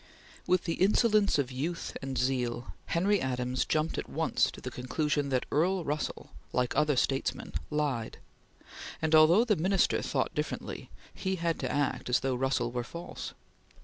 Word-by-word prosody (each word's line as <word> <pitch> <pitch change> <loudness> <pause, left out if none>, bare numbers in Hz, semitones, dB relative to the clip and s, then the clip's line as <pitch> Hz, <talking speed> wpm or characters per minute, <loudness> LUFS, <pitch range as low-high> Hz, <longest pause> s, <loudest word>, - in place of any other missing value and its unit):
With 185 -1 +3
the 165 0 -3
insolence 210 0 +4
of 135 -3 0
youth 155 +7 -3
and 135 -1 -4
zeal, 125 -1 -1
Henry 195 +4 +2
Adams 125 -1 -1
jumped 155 +1 0
at - - -6
once - - +1
to - - -10
the - - -6
conclusion 145 +3 -1
that 130 -2 0
Earl 180 +4 +2
Russell 150 - -3 0.2
like 125 +1 0
other 150 0 +3
statesmen 135 +1 -1 0.2
lied; 145 -7 -1 0.8
and, 160 0 0
although 160 +7 +7
the 215 -4 +3
Minister 190 +4 +2
thought - - -1
differently, - - -4 0.2
he 190 -1 -2
had 170 -2 -1
to - - -2
act 145 -3 -1
as 125 - +3
though 135 -1 0
Russell 125 -1 0
were 120 0 -2
false. 170 +8 -7
150 Hz, 160 wpm, -30 LUFS, 130-170 Hz, 0.8 s, although